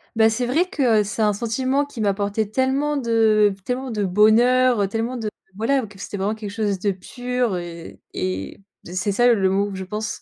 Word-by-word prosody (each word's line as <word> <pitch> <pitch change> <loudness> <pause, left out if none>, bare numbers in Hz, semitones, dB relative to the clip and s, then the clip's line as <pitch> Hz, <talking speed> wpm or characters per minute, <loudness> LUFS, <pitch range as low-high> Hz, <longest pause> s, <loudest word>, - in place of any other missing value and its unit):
Bah, 220 0 +5
c'est 245 +3 -1
vrai 290 +8 +2
que 250 -11 +2
heu, - - 0
c'est 215 +2 -4
un 210 -1 +3
sentiment 255 +6 0
qui 275 -5 -11
m'a 205 -2 +2
apporté 205 +1 -1
tellement 270 +5 0
de 225 -4 +3
v - - -12
tellement 255 0 -3
de 210 -2 -1
bonheur, 235 +5 +4
heu, 195 - +2
tellement 230 +4 -3
de 220 -2 -3 0.3
voilà 255 +2 +1
que 200 -1 -15
c'était 205 - -6
vraiment 200 +2 -1
quelque 215 -2 -7
chose 205 -3 -1
de 200 +1 +1
pur 245 +2 -2
et, 170 -1 -8
et 95 - -4 0.3
b 175 - -10
c'est 195 +2 -1
ça 240 +5 +3
le 195 -4 +2
mot 200 +2 +1
que - - -6
je 190 - -4
pense 210 +3 -5
220 Hz, 225 wpm, -22 LUFS, 200-245 Hz, 0.3 s, Bah